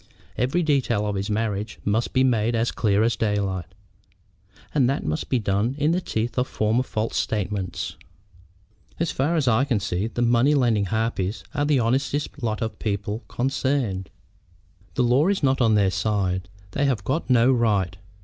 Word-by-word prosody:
Every 135 +8 +1
detail 130 -8 +1
of 105 - -1
his 100 +2 -2
marriage 105 -1 -2
must 110 +3 0
be 130 -1 +3
made 120 -2 +2
as 115 +1 +1
clear 105 -1 +2
as 115 +1 +2
daylight; 100 -5 -1 1.1
and 130 -5 +3
that 135 - -1
must 75 0 -2
be 130 - +2
done 105 +3 0
in 150 +2 +2
the 180 +2 +1
teeth 115 -4 -2
of 125 - 0
former 110 +3 +1
false 110 -3 -3
statements." 100 -3 -2 1.0
"As 165 -1 0
far 145 +6 0
as 150 -5 +1
I 120 +2 +4
can 125 -6 +1
see, 100 +1 -2
the 120 +1 -2
money 120 +5 +4
lending 115 -7 +2
harpies 110 -1 -1
are 145 - 0
the 145 -1 +3
honestest 140 +5 -1
lot 110 -2 -1
of 110 - -5
people 105 0 -2
concerned." 125 - -1 0.9
"The 125 - +2
law 125 +7 +3
is 195 -4 0
not 135 -1 +2
on 110 -3 +4
their 100 -2 +3
side. 95 -2 -1 0.2
They 140 - 0
have 125 -8 0
got 135 - -2
no 125 0 +5
right. 105 -7 +1
115 Hz, 175 wpm, -24 LUFS, 105-130 Hz, 1.1 s, no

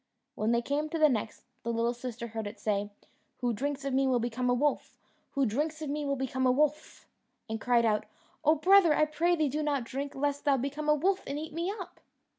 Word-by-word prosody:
When 215 +2 0
they 235 0 +2
came 295 +4 -1
to 330 - -2
the 310 -1 +5
next, 220 -4 -3 0.2
the 235 - -2
little 230 +1 +1
sister 240 -1 -6
heard 220 -1 -4
it 205 - -9
say, 205 -1 -1 0.5
"Who 245 -1 +1
drinks 275 +4 -3
of 275 - -1
me 270 +1 +3
will 255 -1 +3
become 240 +1 -1
a - - +4
wolf; 290 +3 -1 0.4
who 275 -1 +2
drinks 300 +8 -1
of 285 - -3
me 295 0 -2
will 280 0 0
become 260 0 -1
a - - +5
wolf!" 300 +3 0 0.4
and 220 -1 -4
cried 240 -1 +3
out, 210 -1 +1 0.4
"Oh 310 +1 +5
brother, 355 0 +5
I 305 - +4
pray 335 +3 +1
thee 310 -3 +1
do 295 +3 -2
not 290 -4 0
drink, 275 +4 -5
lest 285 +1 -1
thou 285 -2 +3
become 285 +4 -3
a 300 - +6
wolf 370 +6 +1
and 280 - -3
eat 310 +1 -6
me 340 +4 -1
up." 370 - -9
275 Hz, 235 wpm, -30 LUFS, 240-300 Hz, 0.5 s, a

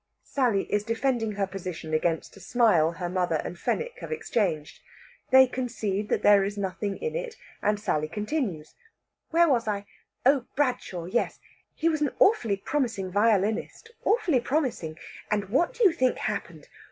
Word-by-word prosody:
Sally 240 -8 +1
is 205 0 +2
defending 230 -1 0
her 200 -1 0
position 180 -4 -6
against 160 +1 0
a - - -13
smile 190 -6 +3
her 175 +1 -4
mother 180 -2 0
and 175 - -6
Fenwick 480 +1 -2
have - - -8
exchanged. 205 - -1 0.5
They 265 0 +8
concede 220 -5 -3
that - - 0
there 205 -1 +6
is 205 +1 -3
nothing 200 +1 -3
in 470 - -4
it, - - -4 0.3
and 210 0 +1
Sally 155 -7 0
continues. 205 - -3 0.6
"Where 340 +1 +4
was 240 -6 +2
I? 205 -1 -2 0.4
Oh, 270 -2 +4
Bradshaw; 250 -11 -1
yes. 225 +7 -1 0.4
He 325 - 0
was 315 -2 +1
an 295 - +2
awfully 230 - +3
promising 225 -6 -2
violinist 215 - +1
awfully 360 - +2
promising! 240 - -1 0.3
And 205 -2 -1
what 275 - +2
do 475 - 0
you 385 - +7
think 260 -6 +1
happened? - - -4
215 Hz, 160 wpm, -27 LUFS, 190-270 Hz, 0.6 s, They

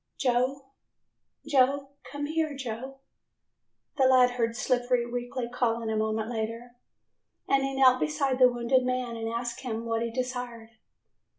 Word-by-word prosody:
"Joe, 265 +2 0 0.7
Joe, 275 0 +2 0.2
come 290 +1 -3
here, 310 -1 -1
Joe," 265 +1 -6 1.0
the 265 - +4
lad 255 -1 +5
heard 230 -2 -1
Slippery 245 -1 +1
weakly 245 0 -4
calling 230 -2 -1
a - - -1
moment 220 0 -1
later, 230 +1 -4 0.8
and 275 0 +3
he 270 0 -2
knelt 255 -1 +5
beside 275 -4 0
the 250 -1 +7
wounded 245 +2 +2
man 250 -2 -2
and 225 0 -3
asked 235 0 -3
him 230 -3 -4
what 230 0 -1
he 235 - -1
desired. 245 -2 -5
245 Hz, 140 wpm, -28 LUFS, 235-265 Hz, 1.0 s, the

